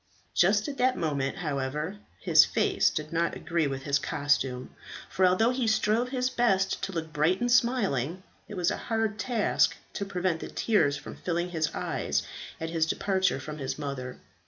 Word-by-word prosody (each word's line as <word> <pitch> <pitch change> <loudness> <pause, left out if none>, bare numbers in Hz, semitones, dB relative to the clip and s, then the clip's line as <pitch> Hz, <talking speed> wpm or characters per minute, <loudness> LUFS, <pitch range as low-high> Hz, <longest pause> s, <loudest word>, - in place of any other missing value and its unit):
Just 205 +4 +3
at 280 -1 -5
that 255 +1 +3
moment, 140 -4 -1
however, 150 +5 -3 0.2
his - - +7
face - - +2
did 155 0 -5
not 170 +1 0
agree 165 -2 -1
with 135 -1 -4
his 145 0 +1
costume, 135 -3 -1 0.3
for 185 0 +3
although 220 +6 +3
he 250 -2 -1
strove 220 +2 +2
his 255 -1 0
best 195 -7 +1
to 195 - -3
look 160 -3 -5
bright 160 +5 +2
and 245 0 0
smiling, 190 - +1 0.2
it 210 - -8
was 175 -1 +1
a - - -2
hard 225 -2 0
task 235 -5 +2 0.2
to - - -3
prevent 180 -3 -1
the - - -6
tears 145 -11 +1
from - - -9
filling 175 0 -2
his 160 -2 0
eyes - - -1 0.4
at 160 0 -4
his 160 -1 +1
departure 190 -6 +1
from 150 +3 -7
his 135 -1 -3
mother. 140 -4 -5
175 Hz, 180 wpm, -28 LUFS, 150-215 Hz, 0.4 s, his